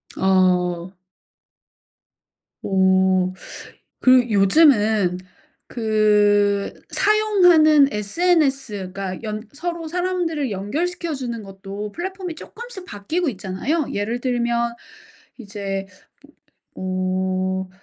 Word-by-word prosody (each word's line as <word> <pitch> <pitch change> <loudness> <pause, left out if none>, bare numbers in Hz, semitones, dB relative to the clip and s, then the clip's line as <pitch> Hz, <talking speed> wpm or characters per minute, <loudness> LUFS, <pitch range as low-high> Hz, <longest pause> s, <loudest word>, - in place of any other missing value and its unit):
어. 180 -1 +1 1.7
어. 190 -1 +2 0.7
그 255 -1 +5
요즘은 210 - +4 0.5
그 210 -2 +2 0.2
사용하는 355 -9 +4
SNS 265 - 0
그러니까 190 -2 -5
연 215 0 -5
서로 335 +2 -5
사람들을 345 -6 -2
연결시켜 320 - -3
주는 240 -5 -5
것도 195 +2 -8
플랫폼이 370 -1 -5
쪼끔씩 455 +1 -10
바뀌고 310 - -3
있잖아요. 220 - -2
예를 220 +4 -2
들면 235 -1 -1 0.6
이제 200 -3 -5 0.9
으 - - -7
음 185 0 -2
215 Hz, 185 characters per minute, -21 LUFS, 195-310 Hz, 1.7 s, 그